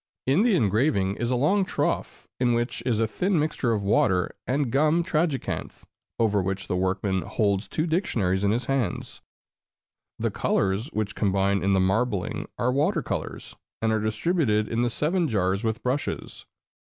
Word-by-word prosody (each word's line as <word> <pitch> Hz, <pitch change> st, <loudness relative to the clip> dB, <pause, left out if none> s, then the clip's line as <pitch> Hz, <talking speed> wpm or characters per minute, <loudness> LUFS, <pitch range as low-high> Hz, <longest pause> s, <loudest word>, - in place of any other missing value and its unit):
In 140 Hz, +9 st, +3 dB
the 230 Hz, -3 st, +4 dB
engraving 105 Hz, -, +1 dB
is 120 Hz, -, -1 dB
a 125 Hz, -, +1 dB
long 185 Hz, +11 st, +3 dB
trough, 185 Hz, -, -2 dB
in 125 Hz, -1 st, +3 dB
which 120 Hz, +1 st, -1 dB
is 115 Hz, -4 st, +1 dB
a 115 Hz, -, +3 dB
thin 180 Hz, -, 0 dB
mixture 150 Hz, -5 st, 0 dB
of 105 Hz, -3 st, 0 dB
water 95 Hz, -2 st, +2 dB
and 135 Hz, -1 st, 0 dB
gum 155 Hz, +5 st, +3 dB
tragacanth, 155 Hz, -4 st, -2 dB, 0.3 s
over 105 Hz, -3 st, +2 dB
which 95 Hz, +1 st, -3 dB
the -, -, -1 dB
workman 95 Hz, +1 st, 0 dB
holds 100 Hz, 0 st, 0 dB
two 155 Hz, -, -1 dB
dictionaries 110 Hz, -, 0 dB
in 100 Hz, -, +3 dB
his 120 Hz, +4 st, 0 dB
hands. 130 Hz, -9 st, -2 dB, 1.0 s
The -, -, -1 dB
colors 100 Hz, +5 st, 0 dB
which 110 Hz, -9 st, -3 dB
combine 100 Hz, -1 st, +1 dB
in 100 Hz, +2 st, +2 dB
the 95 Hz, -, +3 dB
marbling 100 Hz, +1 st, 0 dB
are 125 Hz, -, +1 dB
water 150 Hz, +9 st, +1 dB
colors, -, -, -5 dB, 0.2 s
and 110 Hz, 0 st, +1 dB
are 110 Hz, -, +2 dB
distributed 110 Hz, -1 st, +1 dB
in 115 Hz, +1 st, -1 dB
the 120 Hz, -, +2 dB
seven 165 Hz, +8 st, 0 dB
jars 100 Hz, -4 st, 0 dB
with 110 Hz, +1 st, -2 dB
brushes. 130 Hz, +3 st, -3 dB
115 Hz, 165 wpm, -25 LUFS, 100-145 Hz, 1.0 s, the